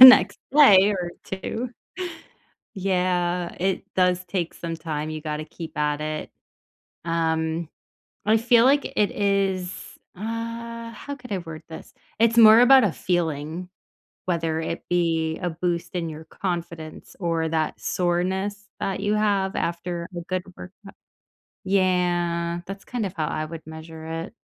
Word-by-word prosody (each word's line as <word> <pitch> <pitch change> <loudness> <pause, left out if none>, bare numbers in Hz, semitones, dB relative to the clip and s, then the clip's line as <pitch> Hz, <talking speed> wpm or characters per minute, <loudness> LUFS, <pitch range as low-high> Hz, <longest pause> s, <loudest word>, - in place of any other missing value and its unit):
the 260 - +15
next 255 - +9 0.2
day 205 -9 +8
or 175 -1 -3
2. 230 +6 -4 1.0
Yeah, 180 -2 0
it 190 +1 0
does 180 -1 +2
take 175 -2 -2
some 165 -1 -5
time. 155 -1 -4
You 155 - -4
gotta 150 0 -3
keep 165 0 -9
at 150 0 0
it. 155 0 -4 0.7
Um, 160 -1 0 0.6
I 220 +1 +5
feel 230 +1 +5
like 280 +2 +4
it 210 - +2
is 195 -3 0 0.4
uh, 230 +2 -5
how 285 +5 -7
could 250 -4 -13
I 195 - +1
word 165 -2 -8
this? 160 - -10 0.3
It's 230 +1 +4
more 220 0 +9
about 260 0 +8
a 200 - +3
feeling, 165 0 -2 0.6
whether 165 -3 0
it 165 +1 -3
be 165 -2 +1
a 175 - 0
boost 170 +1 -2
in 170 -2 -1
your 155 +1 -8
confidence 170 -2 -5
or 165 -3 0
that 160 -1 -1
soreness 190 +4 -1
that 190 -1 -2
you 210 +1 +1
have 200 -2 +1
after 170 0 -2
a - - -3
good 185 +1 -3
workout. 195 +2 -12 0.7
Yeah, 175 -3 +1
that's 195 +1 -7
kind 240 -5 -2
of 185 - -5
how 155 -4 -1
I 155 0 -2
would 160 +1 -7
measure 160 0 -9 0.2
it. - - -11
180 Hz, 145 wpm, -24 LUFS, 165-200 Hz, 1.0 s, the